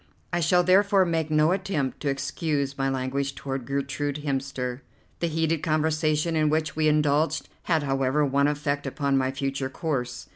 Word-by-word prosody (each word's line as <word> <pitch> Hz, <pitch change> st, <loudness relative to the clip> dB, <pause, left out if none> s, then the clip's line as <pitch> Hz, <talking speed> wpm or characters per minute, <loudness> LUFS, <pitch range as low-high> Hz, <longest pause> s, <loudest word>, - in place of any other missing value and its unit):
I 175 Hz, -, +2 dB
shall 180 Hz, +2 st, +3 dB
therefore 195 Hz, +1 st, +4 dB
make 165 Hz, -2 st, -1 dB
no 155 Hz, +1 st, +3 dB
attempt 180 Hz, -8 st, -1 dB
to 145 Hz, -, -1 dB
excuse 140 Hz, 0 st, -2 dB
my 135 Hz, 0 st, 0 dB
language 135 Hz, +1 st, -2 dB
toward 135 Hz, -3 st, -5 dB
Gertrude 140 Hz, +1 st, -2 dB
Hemster. 135 Hz, -2 st, -2 dB, 0.4 s
The 170 Hz, -, 0 dB
heated 160 Hz, -1 st, 0 dB
conversation 155 Hz, +1 st, +1 dB
in 155 Hz, -1 st, +3 dB
which 155 Hz, 0 st, 0 dB
we 155 Hz, 0 st, +2 dB
indulged 150 Hz, +1 st, +2 dB, 0.2 s
had, 160 Hz, -4 st, +2 dB
however, 135 Hz, +1 st, +1 dB
one 140 Hz, +1 st, +2 dB
effect 145 Hz, -1 st, -1 dB
upon 140 Hz, 0 st, 0 dB
my 130 Hz, -1 st, +2 dB
future 135 Hz, 0 st, -2 dB
course. 125 Hz, -5 st, -3 dB
145 Hz, 160 wpm, -26 LUFS, 135-160 Hz, 0.4 s, therefore